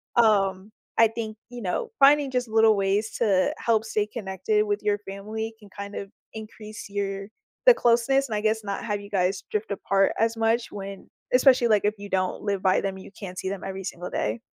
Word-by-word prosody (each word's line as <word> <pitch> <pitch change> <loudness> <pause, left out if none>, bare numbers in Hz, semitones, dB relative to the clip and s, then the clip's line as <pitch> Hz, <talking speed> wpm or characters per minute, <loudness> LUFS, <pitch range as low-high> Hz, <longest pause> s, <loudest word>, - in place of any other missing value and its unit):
Um, 200 -3 +3 0.3
I 225 - +7
think, 220 -1 -5
you 245 -1 -8
know, 215 - -2
finding 280 0 +6
just 250 -2 -1
little 220 -1 +5
ways 200 +2 0
to 195 -5 +2
help 225 -1 +1
stay 210 -1 -1
connected 235 - -1
with 410 0 -1
your 205 -1 +1
family 215 +3 -5
can 205 -2 -16
kind 200 +1 -8
of 195 - -5 0.2
increase 215 -1 -9
your 195 -1 -3 0.4
the - - +11
closeness 245 - +2
and 215 - -2
I - - 0
guess 220 0 +1
not 200 -1 -4
have 205 -2 -2
you 200 - -11
guys 190 -1 0
drift 210 -1 -2
apart 195 0 +1
as 225 0 +1
much 225 +1 +1
when 195 -1 -8 0.2
especially, 250 -2 +5
like, 210 -2 +3
if 210 +1 +1
you 200 0 -9
don't 185 -1 -1
live 200 -2 -1
by 185 - +4
them, 195 -1 -3
you 190 - -11
can't 185 -3 -7
see 190 - -3
them 200 -1 -4
every 195 0 -5
single 180 -2 -6
day. 110 +2 -2
210 Hz, 205 wpm, -25 LUFS, 195-225 Hz, 0.4 s, the